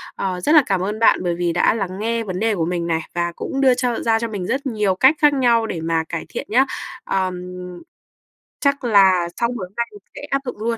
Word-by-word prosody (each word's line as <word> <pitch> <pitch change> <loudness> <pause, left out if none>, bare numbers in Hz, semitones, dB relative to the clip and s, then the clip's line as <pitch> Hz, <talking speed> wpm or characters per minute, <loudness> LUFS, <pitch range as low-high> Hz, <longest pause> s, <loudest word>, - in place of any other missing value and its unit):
Ờ, 185 -2 -3
rất 300 - +2
là 300 - +8
cảm 195 -3 0
ơn 210 +3 -3
bạn 225 - +4
bởi 175 -1 0
vì 175 -1 -1
đã 175 - +3
lắng 195 -3 -4
nghe 230 +1 -1
vấn 185 -3 -4
đề 220 0 +1
của 165 -4 -1
mình 170 0 -2
này 165 -1 0
và 175 0 0
cũng 270 0 -3
đưa 260 -2 +5
cho 245 -1 -1
ra 225 -1 +1
cho 230 - -2
mình 200 -5 -5
rất 280 +2 -2
nhiều 210 -7 0
cách 265 +10 +5
khác 295 -1 +5
nhau 235 -4 +2
để 165 - -4
mà 165 0 0
cải 165 - -4
thiện - - -6
nhá. 255 +5 +4 0.4
Ờ, 190 -1 -1 1.3
chắc 280 -1 +1
là 190 -6 +4
sau 235 0 +1
buổi 205 -6 -4
hôm 185 - -29
nay 235 0 0
mình 415 - -13 0.2
sẽ - - -8
áp 275 0 0
dụng 250 - -5
luôn. 230 +2 -2
215 Hz, 250 wpm, -20 LUFS, 180-245 Hz, 1.3 s, là